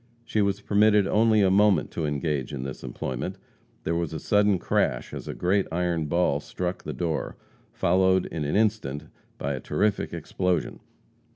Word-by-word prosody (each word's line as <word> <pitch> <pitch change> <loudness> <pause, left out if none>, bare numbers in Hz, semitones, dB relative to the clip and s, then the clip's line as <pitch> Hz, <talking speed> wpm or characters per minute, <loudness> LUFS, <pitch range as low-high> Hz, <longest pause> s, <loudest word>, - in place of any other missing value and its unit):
She 110 - 0
was 100 0 0
permitted 105 0 +4
only 110 +1 +3
a 95 -1 +4
moment 100 -3 +3
to 80 -2 -2
engage 75 -3 -2
in 65 - -4
this 65 -1 -7
employment. 65 -2 -4 0.5
There 85 - -1
was 85 -2 -2
a 80 - -3
sudden 105 +1 +3
crash - - 0
as - - -7
a - - -5
great 95 +2 +1
iron 85 -2 0
ball 85 -3 +1
struck 90 +4 -4
the - - -5
floor, 85 -3 -2 0.3
followed 95 +1 +2
in 80 - -4
an 75 - -1
instant 105 -10 0 0.3
by 70 +1 -2
a 65 - -4
terrific 105 +10 0
explosion. 90 -4 -2
90 Hz, 170 wpm, -26 LUFS, 75-100 Hz, 0.5 s, permitted